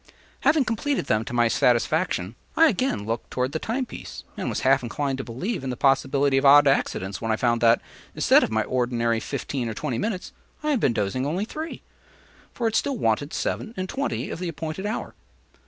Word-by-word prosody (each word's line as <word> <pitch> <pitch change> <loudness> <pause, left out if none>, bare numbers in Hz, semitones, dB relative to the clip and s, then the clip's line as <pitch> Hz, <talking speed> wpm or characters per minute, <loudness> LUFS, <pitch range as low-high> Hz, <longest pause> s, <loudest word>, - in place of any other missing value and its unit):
Having 285 0 +3
completed 260 +5 -1
them 110 0 +1
to - - -7
my 120 -1 +3
satisfaction, 120 - +1 0.2
I 325 0 +7
again 230 - -1
looked 115 +1 -3
toward 130 +1 -1
the 160 - -2
time 250 +8 -2
piece - - -9
and - - -3
was - - -2
half 135 +1 +4
inclined 135 +2 -2
to - - -2
believe 135 - -4
in 135 - -3
the 125 - -3
possibility 135 +1 +2
of - - -4
odd 145 +1 +8
accidents 95 -7 0
when 115 -1 -1
I - - +3
found 120 0 +1
that, 115 0 +5 0.4
instead - - +5
of - - 0
my 110 0 +1
ordinary 120 -1 0
fifteen 125 +1 -3
or 110 - -5
twenty 125 -4 -2
minutes, 195 - -3 0.3
I 305 - +1
had 275 - +2
been 125 - +2
dozing 110 +6 -1
only 180 +7 -1
three; 315 +7 -6 0.7
for 235 - -1
it 220 - -1
still 270 +3 +1
wanted 140 - 0
seven 230 +1 -3
and 185 0 -2
twenty 275 +7 -3
of - - -5
the 180 -1 -3
appointed 165 +4 -4
hour. 215 - -4
135 Hz, 205 wpm, -25 LUFS, -, 0.7 s, odd